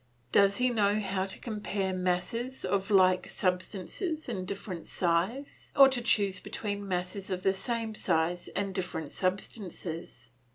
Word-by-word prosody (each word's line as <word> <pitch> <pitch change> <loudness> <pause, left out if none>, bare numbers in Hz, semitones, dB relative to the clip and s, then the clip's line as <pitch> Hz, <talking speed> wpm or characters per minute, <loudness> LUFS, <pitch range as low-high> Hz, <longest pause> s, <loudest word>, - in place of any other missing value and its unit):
Does 200 0 +5
he 250 0 +3
know 210 -2 +3
how 195 -2 -1
to 190 - -5
compare 205 -4 -2
masses 185 +8 -1
of 195 0 0
like 185 -2 +5
substance 185 - -2 0.3
and 190 -7 -3
different 190 -3 -5
size, 185 +11 -1
or 275 -1 +9
to 260 -2 -1
choose 200 -5 +2
between 205 -1 -4
masses 185 +1 -2
of 185 -1 -2
the 195 - +4
same 230 +2 -2
size 175 -3 0
and 195 -1 -1
different 175 -5 -3
substances? 180 - -4
195 Hz, 140 wpm, -30 LUFS, 180-210 Hz, 0.3 s, or